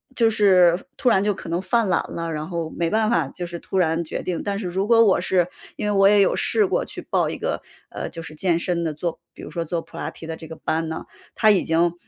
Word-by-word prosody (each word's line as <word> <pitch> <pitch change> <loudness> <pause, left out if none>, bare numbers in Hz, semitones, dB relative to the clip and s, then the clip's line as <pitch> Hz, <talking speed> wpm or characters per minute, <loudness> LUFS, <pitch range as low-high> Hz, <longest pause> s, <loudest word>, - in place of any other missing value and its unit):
就 230 -3 +4
是 185 -4 +5 0.2
突 255 - +2
然 190 -5 +4
就 210 - +2
可 185 - -9
能 170 +2 -1
犯 220 +2 +1
懒 185 - +2
了， 165 0 -3
然 155 0 -4
后 170 -2 -3
没 170 -1 0
办 215 +2 +2
法 165 - +2
就 175 +6 -6
是 170 0 -6
突 190 - -4
然 165 -2 +2
决 - - -5
定。 180 -2 -2
但 200 -1 -2
是 200 -3 -4
如 190 +3 -1
果 230 -1 +6
我 195 - +4
是 180 -2 +1 0.3
因 210 - -4
为 210 - +1
我 195 -1 +5
也 205 0 +6
有 195 - +3
试 435 - +2
过 375 - 0
去 - - -8
报 - - 0
一 - - -4
个， - - -2 0.3
呃， - - -5
就 165 - -7
是 160 - -9
健 170 +2 +1
身 170 0 -1
的 155 - -1
做 165 +2 -4
比 - - -12
如 - - -8
说 170 -1 -3
做 165 +1 -2
普 - - -14
拉 - - -3
提 - - -11
的 160 0 -5
这 160 - -10
个 160 - -8
班 160 +1 -2
呢， 160 - -4 0.3
它 215 -1 +5
已 200 - +3
经 170 +1 +2
175 Hz, 300 characters per minute, -23 LUFS, 165-200 Hz, 0.3 s, 果